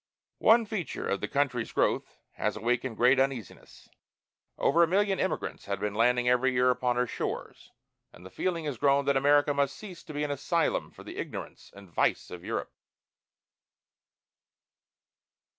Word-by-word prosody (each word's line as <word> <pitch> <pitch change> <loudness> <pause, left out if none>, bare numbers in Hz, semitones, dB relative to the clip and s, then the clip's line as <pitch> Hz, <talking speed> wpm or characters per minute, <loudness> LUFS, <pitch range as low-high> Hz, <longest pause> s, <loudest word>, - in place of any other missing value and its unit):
One 230 +1 +5
feature 200 -6 -4
of 100 - -1
the - - -2
country's 135 -5 -1
growth - - 0
has 105 0 -2
awakened 120 +1 -1
great 130 +2 +5
uneasiness. 135 -8 -3 0.7
Over 165 +4 +3
a 170 - +6
million 195 +2 +1
emigrants 190 - -2
have 100 0 -3
been 105 -1 -2
landing 125 +3 +2
every 125 +1 +3
year 125 0 +4
upon 125 0 0
her 125 0 +2
shores, - - -5 0.4
and 90 - -15
the 95 - -11
feeling 170 -3 -2
has 140 -6 -4
grown 140 0 +3
that 140 0 +2
America 145 +2 +4
must 140 -1 0
cease 190 -5 -10
to 155 - -9
be 145 - -1
an 145 - -2
asylum 160 +4 0
for - - -14
the - - -9
ignorance - - -7
and 100 0 -13
vice 85 - 0
of 90 -1 -8
Europe. - - -4
135 Hz, 160 wpm, -29 LUFS, 120-150 Hz, 0.7 s, a